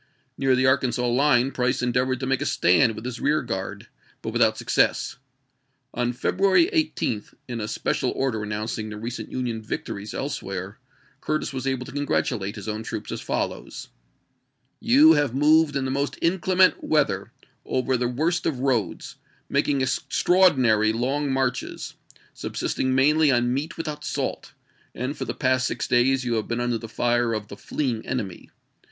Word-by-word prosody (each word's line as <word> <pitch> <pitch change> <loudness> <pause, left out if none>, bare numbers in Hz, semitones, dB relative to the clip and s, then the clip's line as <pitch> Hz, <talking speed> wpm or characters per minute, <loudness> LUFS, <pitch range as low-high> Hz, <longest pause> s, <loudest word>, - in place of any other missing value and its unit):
Near 135 -1 +2
the 130 +1 +2
Arkansas 125 -2 +2
line 125 +1 +3
Price 125 0 0
endeav 125 +1 +1
ored 130 -1 -1
to - - -1
make 135 0 0
a - - -1
stand 105 +7 +3
with 110 - -8
his 125 -1 -5
rear 150 +1 +2
guard, 95 -6 -5 0.4
but - - -4
without - - +3
success. - - +1 0.8
On 120 0 0
February 195 - +2
18, 295 - 0 0.2
in 120 -2 -4
a 105 - -3
special - - -1
order 130 -5 -1
announcing 110 +1 -3
the 105 - -7
recent 115 +3 -6
Union 120 -3 -3
victories 105 -1 -5
else 140 +1 -3
where, 95 0 -6 0.4
Curtis 155 -2 -2
was 130 0 -4
able 130 -2 -1
to 135 - -9
congratulate 120 -7 -1
his 105 -2 -8
own 110 0 -3
troops - - -6
as - - -4
follows: - - -4 0.5
" - - -47 0.2
You 155 +3 +8
have 145 -5 +1
moved 150 +1 +4
in 135 -1 0
the 130 - -2
most 140 +1 -1
inclement 185 +2 +3
weather, 140 -11 +1 0.3
over 130 0 0
the 125 0 0
worst 160 +8 0
of 145 - -1
roads, 130 -5 -1 0.3
making 140 -2 +1
extraordinary 130 - +3
long 135 +5 -1
marches, 130 -2 -2 0.4
subsisting 130 0 -2
mainly 150 +3 +4
on 120 -2 +2
meat 155 +6 -3
without 150 -2 -5
salt, - - -3 0.4
and 130 +5 -3
for - - -4
the - - -4
past 130 -1 +1
six - - -3
days 130 +1 +3
you 120 - 0
have 110 -2 -1
been 120 0 -2
under 120 -1 0
the 115 - -8
fire 120 0 +1
of 105 -1 -5
the - - -7
fleeing 120 0 -2
%m??87' - - -16
enemy. 105 -9 -4
130 Hz, 170 wpm, -24 LUFS, 115-140 Hz, 0.8 s, You